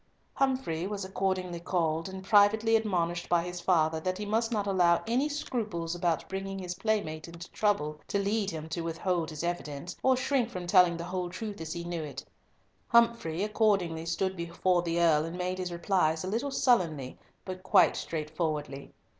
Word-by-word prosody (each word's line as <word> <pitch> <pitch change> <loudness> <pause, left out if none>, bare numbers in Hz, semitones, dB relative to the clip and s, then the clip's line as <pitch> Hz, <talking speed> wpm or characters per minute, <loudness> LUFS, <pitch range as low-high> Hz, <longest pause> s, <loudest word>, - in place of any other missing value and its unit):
Humfrey 260 -11 0
was 200 -1 -4
accordingly 185 -2 -2
called, 165 -1 -1
and, 190 0 -7
privately 215 +2 +5
admonished 175 -6 0
by 170 -1 +3
his 180 0 -6
father 160 -3 +2
that 185 +3 -2
he 210 - -4
must 225 +3 0
not 210 -3 0
allow 180 -3 +3
any 250 +6 +1
scruples 210 - -3
about 175 -2 -1
bringing 195 0 -4
his 180 -2 -4
playmate 180 -6 -2
into 170 +1 -10
trouble 150 -8 0
to - - 0
lead 200 +1 0
him 160 -2 -6
to 170 +2 -3
withhold 165 0 -1
his 155 0 -6
evidence, 170 -1 -4
or 260 -1 +4
shrink 255 -2 +1
from 180 -6 -6
telling 180 -2 +5
the 170 - -5
whole 180 0 -3
truth 200 0 -6
as 160 -1 -4
he 170 -1 -5
knew 170 -1 -3
it, 140 -2 -7 0.6
Humfrey 230 -8 +3
accordingly 195 -7 +1
stood 190 +2 -1
before 175 +1 0
the 170 0 -1
Earl 160 -3 +4
and 165 +2 -5
made 185 +1 -2
his 180 -1 -3
replies 170 -2 +1
a - - -4
little 230 +8 -1
sullenly 170 - +1 0.3
but 185 -1 -6
quite 180 -3 +5
straightforwardly. 155 -3 -4
180 Hz, 180 wpm, -29 LUFS, 165-205 Hz, 0.6 s, privately